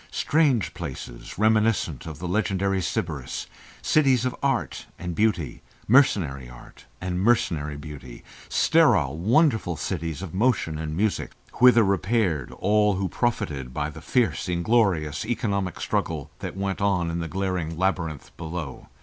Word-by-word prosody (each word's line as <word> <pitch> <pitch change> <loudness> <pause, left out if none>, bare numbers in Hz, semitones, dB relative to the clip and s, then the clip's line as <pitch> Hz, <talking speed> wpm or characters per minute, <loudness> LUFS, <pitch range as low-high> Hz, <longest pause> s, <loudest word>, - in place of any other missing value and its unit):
Strange 145 - +1
places - - -7
reminiscent 110 - +2
of 80 -3 -7
the 90 +3 -5
legendary 95 0 0
Sybaris, 75 -6 -3 0.4
cities 135 -5 +3
of 130 - -1
art 135 -4 -1
and 90 0 -5
beauty, 90 - 0 0.3
mercenary 85 - +3
art - - -15
and 90 -1 -3
mercenary 80 -10 +1
beauty, 70 -4 -10 0.3
sterile 70 +2 +3
wonderful 110 - +2
cities 85 -2 -3
of 85 - -7
motion 95 -7 +1
and 80 0 -4
music, 105 +1 -1 0.3
whither 125 -2 +7
repaired 95 - 0
all 105 -1 +2
who 95 0 -1
profited 75 - -2
by 75 0 -2
the 80 +1 -11
fierce, 115 +1 0
inglorious, 85 -4 +1
economic 105 -6 -2
struggle - - -2
that - - -6
went 95 0 -2
on 90 -4 +1
in 85 - -2
the 85 - -3
glaring 90 -3 -2
labyrinth 85 -5 -2
below. 80 -4 -6
95 Hz, 135 wpm, -25 LUFS, 80-110 Hz, 0.4 s, whither